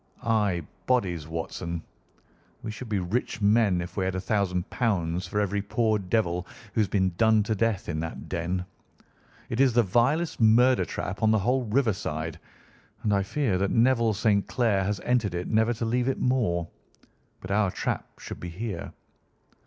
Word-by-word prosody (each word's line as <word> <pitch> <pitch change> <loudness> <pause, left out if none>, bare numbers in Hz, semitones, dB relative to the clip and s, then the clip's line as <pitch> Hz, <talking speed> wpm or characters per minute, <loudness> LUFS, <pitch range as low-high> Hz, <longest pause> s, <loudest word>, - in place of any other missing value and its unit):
"Ay, 105 -8 +1 0.2
bodies, 90 -11 +1
Watson. 85 +1 -4 0.8
We 110 - -4
should 110 +2 -8
be 105 - 0
rich 95 +6 -2
men 105 -3 +3
if 85 - -7
we 95 - 0
had 95 0 -1
£ 95 -2 0
1000 90 -7 0
for 105 - -1
every 100 0 0
poor 110 +1 +1
devil 90 -3 0 0.3
who 110 - +2
has 105 - +2
been 95 -1 +1
done 110 -1 +5
to 110 - -1
death 110 -1 0
in 80 -2 -2
that 80 0 -5
den. 90 +2 -2 0.8
It 115 - -3
is 135 -3 +5
the 120 0 +4
vilest 125 - +1
murder 120 +4 +5
trap 100 - -5
on 110 - +4
the 110 - +4
whole 125 +5 +1
riverside, 90 - -1 0.6
and 105 - +2
I 100 - +3
fear 100 -1 0
that 100 0 +1
Neville 115 -2 +3
St. 100 -1 +2
Clair 110 -6 +1
has 100 -1 -1
entered 115 -7 +1
it 90 +1 -3
never 110 +1 +2
to 115 - -3
leave 120 +2 0
it 135 - 0
more. 105 -10 +1 0.7
But 95 - -7
our 105 -1 +3
trap - - -3
should - - -8
be 90 - -6
here." 105 +5 -5
105 Hz, 175 wpm, -27 LUFS, 90-115 Hz, 0.8 s, done